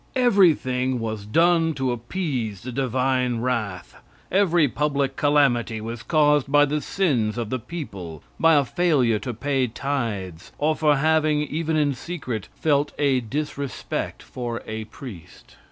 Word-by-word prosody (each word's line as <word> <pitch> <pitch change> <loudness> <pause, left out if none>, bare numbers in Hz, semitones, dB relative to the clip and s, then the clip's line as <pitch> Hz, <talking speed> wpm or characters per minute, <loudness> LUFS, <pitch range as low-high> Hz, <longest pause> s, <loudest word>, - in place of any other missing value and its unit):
Everything 155 - +3
was 110 -2 -4
done 165 +5 +3
to 130 -2 0
appease 120 - -3
the 125 - -5
divine 125 -1 0
wrath; 110 -8 -2 0.4
every 175 -5 +4
public 140 -1 -1
calamity 135 -6 +2
was 115 +1 -6
caused 150 -3 +2
by 145 0 +6
the 150 +1 -1
sins 125 - 0
of 115 -3 -3
the 130 - -1
people; 100 - -7 0.2
by 165 -1 +5
a 140 -2 +4
failure 135 - +2
to 125 - -4
pay 130 +2 0
tithes, 110 - -4
or 155 +1 +1
for 150 -2 +3
having, 155 0 +2
even 160 +2 -2
in 145 -2 +2
secret, 130 - -5
felt 145 -2 +1
a 140 -3 +2
disrespect 140 +3 -4
for 120 -2 -5
a 110 0 -5
priest. 105 - -12
135 Hz, 140 wpm, -24 LUFS, 115-150 Hz, 0.4 s, by